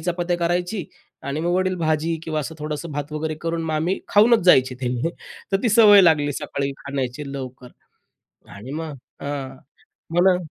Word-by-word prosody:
चपात्या 175 +1 -1
करायची 175 +2 -1 0.4
आणि 140 +3 -3
मग 175 - 0
वडील 185 0 +1
भाजी 160 0 0
किंवा 155 -1 -2
असं 160 +3 -6
थोडंसं 155 +2 -4
भात 145 +1 -5
वगैरे 155 +1 -2
करून 165 0 -2
मग 160 -1 -2
आम्ही 170 +5 0
खाऊनच 225 +3 +5
जायचे 130 -6 +5
ते 125 - -1
म्हणजे 125 +7 -1 0.4
तर 195 - +1
ती 240 - +2
सवय 210 -2 +8
लागली 150 -4 +3
सकाळी 140 +1 -3
खाण्याची 140 0 -4
लवकर 130 -2 -7 0.9
आणि 105 +6 -9
मग 155 0 -5 0.3
हां, 140 -2 -5 0.6
मला 180 +1 +5
155 Hz, 165 wpm, -22 LUFS, 140-175 Hz, 0.9 s, सवय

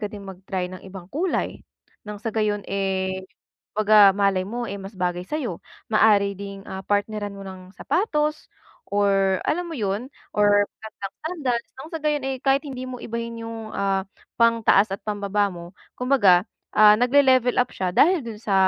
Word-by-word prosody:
ka 210 - -2
ding 205 -2 -9
mag-try 190 -1 -4
ng 185 - -8
ibang 185 -2 -10
kulay, 345 +5 -1 0.5
nang 210 - -5
sa 225 +1 -4
gayon 210 -2 0
eh, 190 -1 -1 0.5
kumbaga 210 -1 +6
malay 195 -2 +2
mo 240 +3 -4
eh 200 - -5
mas 195 +2 -9
bagay 180 0 -1
sa'yo, 260 - -3 0.3
maari 205 -2 +4
ding, 200 -1 -7
ah, 190 0 -6
partneran 205 0 -1
mo 195 - -9
ng 185 -1 -10
sapatos 305 -6 -1 0.4
or 195 -2 +2
alam 350 +3 0
mo - - -5
yun 205 +4 -2 0.3
or 205 0 +4
flat 220 0 -10
na 195 - -3 0.2
sandals, 265 -9 -2
nang 290 - -8
sa 325 - -2
gayon 300 -2 0
eh, 265 -1 -2
kahit 275 +1 +3
hindi 260 -2 -6
mo 255 -1 -6
ibahin 230 0 -5
yung, 225 -1 -7
ah, 195 -1 0 0.4
pangtaas 225 -3 +4
at 200 - -9
pambaba 205 -1 0
mo, 170 0 -9 0.3
kumbaga 240 -9 +4 0.3
ah 210 0 +8
nagle-level 255 -1 +4
up - - -9
siya 185 -1 -1
dahil 350 - +5
dun 225 -2 -7
sa, 200 -3 0
210 Hz, 175 wpm, -23 LUFS, 195-245 Hz, 0.5 s, ah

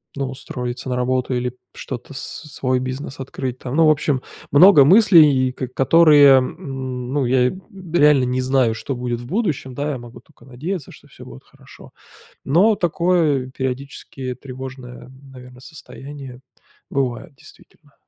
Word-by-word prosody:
ну, 135 -1 -3
устроиться 125 -1 -6
на 125 - -1
работу, 125 +1 -1
или 125 0 -3 0.2
что-то 130 +2 -8
с 130 - -6 0.3
свой 130 -1 -1
бизнес 130 +2 -6
открыть, 130 -1 -5
там, 125 +1 -6
ну, 165 0 +4
в - - +5
общем, 145 -3 +1 0.3
много 150 0 +7
мыслей, 155 - +5
и - - -6
ко 130 0 -6
которые, 145 +1 +5
м, 130 -1 -6
ну, 145 -3 0
я 125 0 +2 0.2
б 185 -3 -5
реально 145 -4 +5
не 125 +1 -1
знаю 130 -3 +1
что 135 +4 -5
будет 120 -1 -4
в - - -10
будущем, 160 - -2
да, 145 +2 -2
я 135 - -4
могу 120 0 -12
тока 135 -6 -23
надеяться, 145 +6 -6
что - - -17
всё - - -15
будет 65 - -13
хорошо, - - -17 0.5
но 190 +10 +3
такое, 170 -6 0
периодически, 130 0 -6
тревожное, 130 -1 -10 0.2
наверно, 125 -1 -14
состояние 135 -3 -11 0.5
бывает, 135 +3 -3
действительно. 145 +2 -20
130 Hz, 155 wpm, -20 LUFS, 125-150 Hz, 0.5 s, много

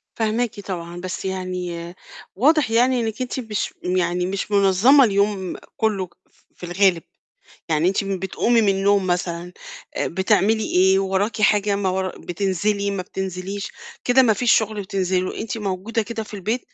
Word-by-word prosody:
فاهماكِ 225 0 -1
طبعًا، 175 -3 -6
بس 185 +1 -5
يعني 180 -2 -4 0.4
واضح 285 - +3
يعني 245 +2 +3
إنِّك 225 +2 -3
أنتِ 255 +1 -3
مش 220 -4 -3
يعني 180 -1 0
مش 195 +2 -3
منظّمة 200 +8 +5
اليوم 200 -3 +1 0.2
كلّه، 200 -5 0 0.2
ف - - -34
في 180 - -9
الغالب، 175 -1 +2 0.7
يعني 160 +3 +2
أنتِ 195 +1 0
م 195 -1 -2
بتقومي 230 +5 +1
من 205 - +2
النوم 195 0 +2
مثلًا، 175 0 -2 0.4
آآ، - - 0
بتعملي 200 +4 +2
إيه؟ 190 +1 +4
وراكِ 195 +3 -1
حاجة، 205 -1 +3
ما 195 -2 0
ورا 185 0 -2
بتنزلي، 200 +3 -1
ما 195 -2 -3
بتنزليش؟ 190 +2 -5 0.4
كده 255 +1 +5
ما 225 -3 +4
فيش 235 +3 +2
شُغل 215 -2 -1
بتنزلي 185 -1 0
له، 185 - -4
أنتِ 225 +1 -4
موجودة 205 +3 -2
كده 225 +1 -5
في 210 - -10
البيت، 215 +6 -2
195 Hz, 160 wpm, -22 LUFS, 185-220 Hz, 0.7 s, منظّمة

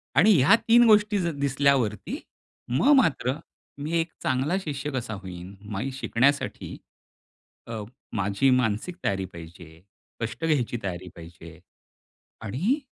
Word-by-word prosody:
आणि 200 +10 +6
ह्या 135 - +6
3 235 +1 +7
गोष्टी 210 -1 +5
ज 170 - 0
दिसल्यावरती 135 -6 +1 0.6
मग 190 - +4
मात्र 150 - +2 0.5
मी 150 - -4
एक 165 0 -2
चांगला 135 +7 +1
शिष्य 145 -4 -4
कसा 120 -4 -3
होईन? 95 -1 -8 0.2
माई 115 +7 -3
शिकण्यासाठी 135 +1 0 0.9
अ, 115 -2 -5 0.3
माझी 100 +6 +1
मानसिक 120 - -1
तयारी 95 -1 0
पाहिजे, 80 -1 -12 0.4
कष्ट 115 +7 -4
घ्यायची 135 -7 +1
तयारी 90 -1 -5
पाहिजे. 85 -1 -12 0.8
आणि 165 - -1
130 Hz, 120 wpm, -26 LUFS, 100-155 Hz, 0.9 s, 3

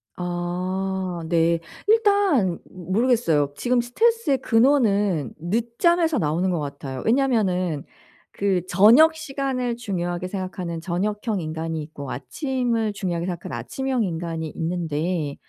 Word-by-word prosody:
아 180 0 -3
네. 165 0 +2 0.3
일단 400 - +3
모르겠어요. 185 - +1
지금 245 - +1
스트레스의 345 - +2
근원은 210 - +2
늦잠에서 235 - +1
나오는 170 +2 0
것 175 - 0
같아요. 140 -2 -5
왜냐하면은 200 - +1 0.5
그 195 -3 0
저녁 235 - +6
시간을 270 -5 -2
중요하게 180 -6 -3
생각하는 185 -3 -4
저녁형 205 +4 -2
인간이 160 0 -3
있고 145 -3 -8
아침을 235 - -1
중요하게 175 -4 -2
생각하는 170 -8 -4
아침형 250 - -2
인간이 165 -3 -3
있는데 165 -2 -2
185 Hz, 300 characters per minute, -23 LUFS, 170-245 Hz, 0.5 s, 저녁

